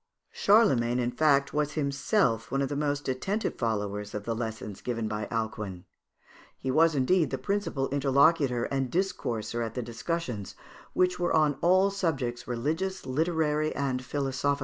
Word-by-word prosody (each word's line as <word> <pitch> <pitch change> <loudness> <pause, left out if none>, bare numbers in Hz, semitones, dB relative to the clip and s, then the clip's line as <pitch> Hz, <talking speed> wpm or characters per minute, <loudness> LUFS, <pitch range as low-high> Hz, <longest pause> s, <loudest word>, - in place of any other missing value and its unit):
Charlemagne, 135 - +4
in 120 -1 0
fact, 140 +1 +2
was 150 0 0
himself 140 - +1
one 135 +2 0
of 135 - -2
the 145 - -3
most 145 0 -1
attentive 195 - -1
followers 105 -2 -2
of 105 - -4
the 115 - -2
lessons 110 -3 -5
given 115 -3 -2
by 105 -1 -3
Alcuin. 110 -5 -4 0.7
He 130 - -2
was 160 +3 +4
indeed 155 +6 +3
the - - -2
principal 200 -10 -1
interlocutor 140 -2 +3
and 135 -1 -1
discourser 120 - -2
at 115 -1 -5
the 125 - -2
discussions, 120 - -4 0.4
which 180 0 +2
were 175 - +1
on 155 -2 +3
all 185 +3 +4
subjects, 135 -11 -2
religions, 160 +11 -2
literary, 155 +1 0
and 130 -2 -1
philosophical. 140 +1 -1
135 Hz, 150 wpm, -28 LUFS, 120-160 Hz, 0.7 s, Charlemagne